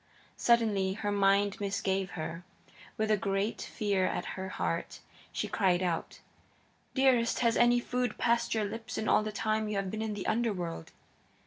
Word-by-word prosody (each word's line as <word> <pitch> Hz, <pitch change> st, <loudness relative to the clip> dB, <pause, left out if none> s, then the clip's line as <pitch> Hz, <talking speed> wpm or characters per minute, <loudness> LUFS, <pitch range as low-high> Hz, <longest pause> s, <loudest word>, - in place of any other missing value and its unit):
Suddenly 215 Hz, -5 st, +3 dB
her 205 Hz, 0 st, -2 dB
mind 200 Hz, 0 st, +3 dB
misgave 195 Hz, -1 st, -1 dB
her. 165 Hz, +2 st, -5 dB, 0.5 s
With 215 Hz, 0 st, +1 dB
a 215 Hz, -, +4 dB
great 195 Hz, +3 st, -1 dB
fear 200 Hz, -4 st, 0 dB
at -, -, -2 dB
her 190 Hz, 0 st, -5 dB
heart 85 Hz, -, -3 dB, 0.3 s
she -, -, -2 dB
cried 185 Hz, -1 st, +2 dB
out: 170 Hz, -2 st, -2 dB, 0.7 s
"Dearest, 255 Hz, -4 st, +3 dB
has 235 Hz, -1 st, +3 dB
any 240 Hz, 0 st, +5 dB
food 245 Hz, -1 st, -2 dB
passed 235 Hz, 0 st, +1 dB
your 215 Hz, -1 st, +1 dB
lips 225 Hz, +3 st, -6 dB
in 220 Hz, -, -2 dB
all -, -, +5 dB
the 215 Hz, 0 st, -3 dB
time 215 Hz, 0 st, -1 dB
you 210 Hz, -, -2 dB
have 195 Hz, -1 st, -1 dB
been 220 Hz, -, -3 dB
in 220 Hz, -1 st, -2 dB
the 200 Hz, -, -5 dB
Underworld?" 195 Hz, -, -1 dB
205 Hz, 170 wpm, -31 LUFS, 190-225 Hz, 0.7 s, any